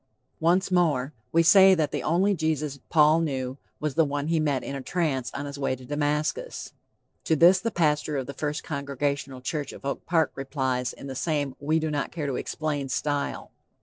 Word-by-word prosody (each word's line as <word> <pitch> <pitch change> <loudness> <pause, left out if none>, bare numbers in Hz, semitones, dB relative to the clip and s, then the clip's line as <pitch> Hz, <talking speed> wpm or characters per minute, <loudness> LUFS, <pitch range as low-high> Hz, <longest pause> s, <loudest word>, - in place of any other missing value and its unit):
Once 180 +4 +2
more; 155 -6 +2 0.2
we 165 0 +4
say 190 +2 +7
that 155 -4 0
the - - -2
only 185 +6 +2
Jesus 155 -5 -1
Paul 155 0 +5
knew 135 -4 -3 0.2
was 150 -2 -2
the 165 - +4
one 145 0 -2
he 165 -1 +2
met 145 -4 0
in 140 - -5
a 135 - -4
trance 140 -5 -1
on 140 - -3
his 140 0 -7
way 135 -1 0
to 130 0 -13
Damascus. 150 - -2 0.5
To 160 - +3
this 175 +5 +6
the 230 - -1
pastor 150 -5 +1
of 135 - -2
the 140 - -7
First 150 +1 -3
Congregational 140 -2 -3
Church 145 +2 -3
of - - -12
Oak 140 - -4
Park 165 -2 +2
replies 130 -2 -2
in - - -11
the 135 - -5
same 145 -1 -1
we 155 +3 +1
do 160 -1 -1
not 145 -1 -2
care 160 -4 -4
to 140 -2 -2
explain 145 -2 -3
style. 145 +1 -2
150 Hz, 200 wpm, -26 LUFS, 140-160 Hz, 0.5 s, say